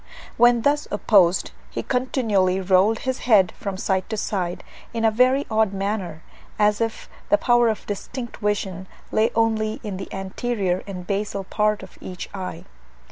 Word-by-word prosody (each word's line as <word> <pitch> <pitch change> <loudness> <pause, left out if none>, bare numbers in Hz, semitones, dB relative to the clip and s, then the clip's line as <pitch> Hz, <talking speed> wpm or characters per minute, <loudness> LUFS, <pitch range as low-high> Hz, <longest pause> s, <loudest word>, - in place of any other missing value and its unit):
When 240 0 +5
thus 290 +2 +2
opposed 195 -4 +3 0.2
he - - -4
continually 220 -8 +1
rolled 190 +4 +3
his 260 0 -1
head 195 -5 +6
from 195 -2 -5
side 190 -1 -1
to 220 - -3
side, 180 -4 -2 0.3
in 225 0 0
a 220 - +5
very 255 +5 +3
odd 220 -2 +2
manner, 195 -5 -3 0.3
as 210 +1 +3
if 225 -1 -2 0.2
the 205 - +5
power 240 0 +4
of 220 - -3
distinct 235 +4 -6
vision 195 -3 -2 0.2
lay 220 +1 +3
only 220 -1 +1
in 205 -4 -4
the 195 - -7
anterior 195 -1 -2
and 180 -3 -6
basal 200 0 -2
part 210 +1 0
of 190 - -13
each 180 -1 -7
eye. 190 -2 -6
210 Hz, 160 wpm, -23 LUFS, 190-225 Hz, 0.3 s, head